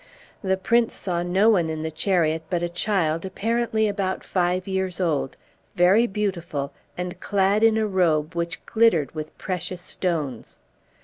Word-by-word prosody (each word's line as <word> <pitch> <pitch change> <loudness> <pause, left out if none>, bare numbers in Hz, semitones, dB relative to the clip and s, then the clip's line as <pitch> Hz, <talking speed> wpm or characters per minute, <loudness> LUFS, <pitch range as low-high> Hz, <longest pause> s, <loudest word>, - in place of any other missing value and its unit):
The 190 -1 +1
prince 230 +4 +2
saw 175 -3 -2
no 185 +5 +3
one 175 -6 +2
in 155 0 -3
the 160 - -3
chariot 160 -1 +1
but 175 -2 -1
a 175 - -1
child 170 -3 0
apparently 220 +3 0
about 195 -2 -2
five 180 0 0
years 190 -1 -2
old, 155 -7 -1 0.4
very 195 +7 +5
beautiful, 175 -9 -3 0.2
and 180 0 -4
clad 200 +2 +2
in 225 -1 +5
a 220 - +2
robe 170 -5 +1
which 170 0 -3
glittered 220 -11 +3
with 155 -1 -7
precious 180 0 -4
stones. 155 -10 -3
180 Hz, 150 wpm, -24 LUFS, 165-200 Hz, 0.4 s, very